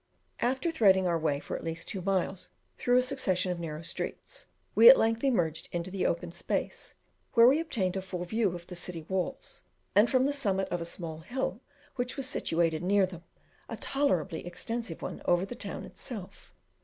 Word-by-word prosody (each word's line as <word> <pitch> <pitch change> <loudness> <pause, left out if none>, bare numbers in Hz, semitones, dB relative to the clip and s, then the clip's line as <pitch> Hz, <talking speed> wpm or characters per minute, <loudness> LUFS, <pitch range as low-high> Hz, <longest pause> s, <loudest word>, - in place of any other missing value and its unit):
After 260 +7 0
threading 195 - +4
our 170 -2 +1
way 150 -3 0
for - - -5
at - - -6
least 165 0 -4
two 195 - -4
miles 190 0 -1 0.3
through 245 0 +2
a 250 - +5
succession 190 -9 0
of 175 - -3
narrow 160 -1 -5
streets, - - -5 0.3
we 470 - +10
at - - +10
length 225 +2 +1
emerged 175 - +1
into 175 +1 -3
the 195 -1 0
open 170 0 -2
space, - - -3 0.4
where 230 +1 +8
we 275 +5 +5
obtained 215 - -1
a 190 - -1
full 180 -1 -5
view 205 -1 0
of 170 0 -9
the 180 - -9
city 170 -2 -6
walls, 190 -1 -3 0.3
and 210 +4 +5
from 255 0 +3
the 285 - +1
summit 195 -9 +1
of 175 - -2
a - - -3
small 165 -2 -5
hill 245 +3 -3 0.4
which 245 +2 -2
was 275 - -2
situated 165 - 0
near 195 +2 +3
them, 180 -2 -9 0.5
a - - -5
tolerably 190 - 0
extensive 180 +1 -5
one - - -5
over 175 +1 +3
the 220 - -7
town 245 - -5
itself. 210 -8 -9
190 Hz, 190 wpm, -30 LUFS, 170-240 Hz, 0.5 s, we